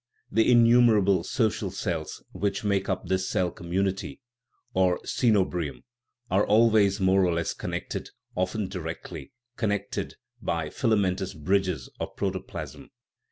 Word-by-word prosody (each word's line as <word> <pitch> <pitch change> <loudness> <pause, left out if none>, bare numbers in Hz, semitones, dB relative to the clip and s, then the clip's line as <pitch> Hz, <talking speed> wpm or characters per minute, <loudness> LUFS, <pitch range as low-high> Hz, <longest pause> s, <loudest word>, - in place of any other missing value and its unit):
The 115 +2 +4
innumerable 115 -6 +5
so 115 +1 +1
cial 100 -3 -4
cells, 85 -6 -4
which 100 +3 -2
make 100 -2 0
up 95 - -1
this 95 0 0
cell 90 -4 +1
community 95 +3 -2 0.5
or 95 -1 +3
coeno 110 -6 +3
bium, 75 -8 -4 0.5
are 95 +3 +4
always 105 -2 +4
more 95 0 +4
or 90 - +2
less 85 -1 -1
connected, - - -5 0.3
often 95 +3 -1
directly 80 -4 -6 0.3
connected 100 -3 -2 0.3
by 85 -3 -2
filamentous 95 -5 0
bridges 90 -2 0
of - - -5
protoplasm. 95 -1 -5
95 Hz, 125 wpm, -27 LUFS, 90-105 Hz, 0.5 s, innumerable